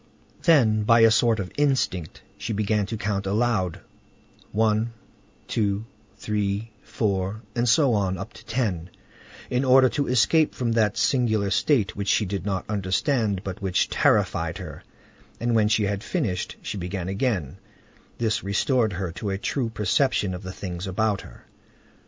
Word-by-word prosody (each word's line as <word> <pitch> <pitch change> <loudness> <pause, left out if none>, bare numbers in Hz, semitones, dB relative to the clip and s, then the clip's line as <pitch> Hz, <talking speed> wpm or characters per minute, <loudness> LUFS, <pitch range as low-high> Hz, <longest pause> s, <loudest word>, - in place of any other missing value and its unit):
Then, 120 - +4
by 115 +2 +5
a 115 0 +7
sort 115 -1 +3
of 95 -2 -4
instinct, 130 - 0
she 115 - -4
began 105 -1 0
to 110 - -4
count 100 -1 -2
aloud, 105 -4 0 0.7
one, 110 +2 +1 0.5
two, 105 -1 -1 0.3
three, 105 +1 -2
four, 100 0 -2
and 120 0 +1
so 140 -1 +4
on 95 -3 0
up 95 +5 -7
to - - -14
ten, 105 -8 -2 0.6
in 125 +1 +1
order 130 0 +6
to 145 +1 -1
escape 150 +6 +3
from 120 -2 -1
that 110 -1 +2
singular 110 -2 +1
state 125 -11 +2
which 100 0 -4
she 105 - +3
did 100 +1 -4
not 95 -3 -2
understand, 100 +1 0
but 95 -1 -6
which 95 -2 +1
terrified - - +1
her, - - -8 0.6
and, 120 +1 0
when 110 -2 +4
she 110 0 +2
had 100 +1 -2
finished, 95 -2 -2
she 100 - -4
began 90 0 -4
again; 95 - -1 0.6
this 110 -2 0
restored 110 +2 +1
her 90 -1 -3
to 100 +4 -5
a 95 - -1
true 120 +4 -2
perception 110 -2 +1
of 90 - -6
the 95 -2 -6
things 90 0 -6
about 100 +1 0
her. - - -15
105 Hz, 160 wpm, -25 LUFS, 95-115 Hz, 0.7 s, a